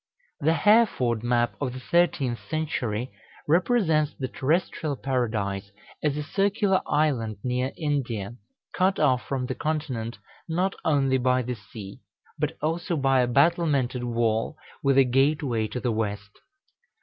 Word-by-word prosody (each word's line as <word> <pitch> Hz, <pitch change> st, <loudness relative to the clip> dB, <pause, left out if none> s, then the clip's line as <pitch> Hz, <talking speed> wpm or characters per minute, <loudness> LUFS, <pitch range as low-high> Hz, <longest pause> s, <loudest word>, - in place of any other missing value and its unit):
The 160 Hz, +3 st, +2 dB
Hereford 190 Hz, -, +3 dB
map 120 Hz, 0 st, +1 dB
of 130 Hz, -3 st, -1 dB
the 130 Hz, -, -6 dB
thirteenth 140 Hz, -5 st, +1 dB
century 130 Hz, -7 st, -2 dB, 0.4 s
represents 165 Hz, -, +2 dB
the 130 Hz, -, -3 dB
terrestrial 150 Hz, +2 st, -1 dB
Paradise 110 Hz, -7 st, -2 dB, 0.3 s
as 150 Hz, -1 st, 0 dB
a 150 Hz, -, -2 dB
circular 195 Hz, +3 st, +1 dB
island 135 Hz, -8 st, +1 dB
near 125 Hz, +1 st, -1 dB
India, 120 Hz, -, -2 dB, 0.4 s
cut 190 Hz, +1 st, +2 dB
off 130 Hz, -5 st, +3 dB
from 135 Hz, -2 st, -2 dB
the 130 Hz, -, -3 dB
continent 130 Hz, -7 st, -3 dB, 0.3 s
not 180 Hz, +4 st, 0 dB
only 135 Hz, -4 st, +2 dB
by 125 Hz, 0 st, +2 dB
the 125 Hz, +1 st, -3 dB
sea, 105 Hz, -2 st, -10 dB, 0.4 s
but -, -, -1 dB
also 165 Hz, +2 st, -1 dB
by 135 Hz, -2 st, +3 dB
a 125 Hz, -, +2 dB
battlemented 140 Hz, -2 st, +2 dB
wall, 115 Hz, +3 st, 0 dB, 0.2 s
with 135 Hz, -1 st, +2 dB
a 135 Hz, -, +8 dB
gateway 135 Hz, -3 st, +1 dB
to 125 Hz, -, -4 dB
the 120 Hz, -1 st, -1 dB
west. 105 Hz, -2 st, -3 dB
135 Hz, 135 wpm, -26 LUFS, 120-155 Hz, 0.4 s, a